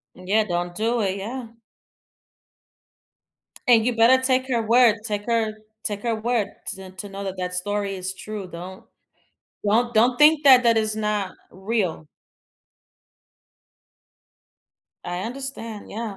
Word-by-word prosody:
Yeah, 200 +4 +1
don't 175 -2 -3
do 230 +4 0
it. 195 -1 -1
Yeah. 235 +4 -6 2.2
And 230 -2 +6
you 245 -2 0
better 255 +3 +5
take 260 0 +2
her 235 -3 +1
word. 230 0 +5
Take 205 -2 -3
her 230 -2 +1 0.3
take 205 -1 -3
her 235 -1 0
word 220 -2 0 0.3
to 190 -1 -10
to 185 +2 -8
know 200 0 -7
that 190 -1 -4
that 180 0 -3
story 200 +2 -2
is 185 +1 -4
true. 205 -1 -7
Don't 180 +2 -9 0.8
don't 235 +4 +2
don't 240 +3 +4
think 300 0 +6
that 260 -3 +8
that 230 -1 +4
it's 215 -1 0
not 210 -3 -1 0.2
real. 190 -6 -2 3.0
I 175 0 -4
understand, 240 -4 -6
yeah. 220 -2 -5
215 Hz, 135 wpm, -23 LUFS, 190-235 Hz, 3.0 s, that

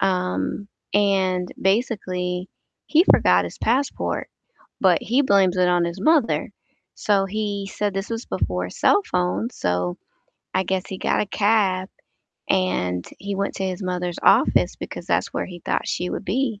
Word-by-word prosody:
um, 185 +1 -1 0.2
and 190 -3 +2
basically, 185 -4 -1 0.4
he 325 +3 +4
forgot 90 - +5
his 85 - -7
passport, 260 +5 -1 0.5
but - - +4
he 255 +5 +2
blames 195 -6 +3
it 180 -1 +3
on 175 -1 +3
his 170 +2 -4
mother. 295 0 +2 0.4
So 200 -2 +1
he 200 -1 -3
said 205 -2 -2
this 195 +3 -3
was 230 +1 -4
before - - -2
cell 410 - +3
phones, 180 +7 -1
so 90 0 -1 0.6
I 190 0 +2
guess 190 0 -1
he 190 - -6
got - - +1
a - - -1
cab 200 -3 +1 0.6
and 90 - 0
he 200 0 -4
went 200 +1 -2
to 195 - -3
his 185 +1 -3
mother's 180 -1 -3
office - - +4
because - - -7
that's - - 0
where - - -2
he 175 -2 -10
thought - - -1
she 180 +1 -2
would - - -4
be. 225 0 -1
190 Hz, 160 wpm, -23 LUFS, 180-210 Hz, 0.6 s, forgot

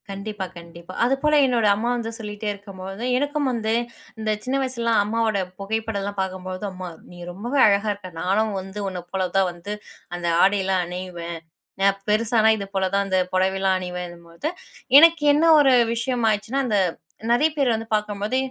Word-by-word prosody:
கண்டிப்பா, 200 0 -5
கண்டிப்பா. 170 +1 -11
அதுபோல 270 +4 +1
என்னோட 240 -4 +1
அம்மா 230 +4 -1
வந்து 230 -1 -3
சொல்லிட்டே 210 -1 -6
இருக்கும்போது, 195 +1 -9
எனக்கும் 290 0 0
வந்து 225 -2 -1 0.5
இந்த 215 -1 -1
சின்ன 255 +3 -1
வயசுலலாம் 235 -4 +1
அம்மாவோட 220 -1 0 0.2
புகைப்படம்லாம் 205 -1 -3
பாக்கும்பொழுது, 185 +1 -5
அம்மா 185 -1 -7 0.2
நீ 175 - -12
ரொம்பவே 240 +10 -2
அழகா 205 +1 +2
இருக்க. 200 -2 -10
நானும் 205 +4 +1
வந்து 190 +2 -8
உன்னப்போலதான் 185 +1 -1
வந்து 175 +4 -7 0.4
அந்த 175 -1 -3 0.2
ஆடைலாம் 190 -1 +2
அணியுவேன். 175 -1 -6 0.4
நா - - +4 0.2
பெருசானா, 220 +1 +3
இதுபோலதான் 195 0 -1
அந்த 190 -1 +2
புடவைலாம் 190 0 +2
அணியுவேன்னும் 180 -1 -7
போது, 170 - -5 0.5
எனக்கு 330 0 +6
என்ன 300 +3 +2 0.2
ஒரு 275 -3 +5 0.2
விஷயமாச்சின்னா 230 0 0
அந்த 210 -3 +2 0.5
நெறைய 295 +7 +4
பேர் 260 -5 +2
வந்து 225 0 -5
பாக்கும்போது. 210 +3 -2
205 Hz, 145 wpm, -23 LUFS, 185-230 Hz, 0.5 s, எனக்கு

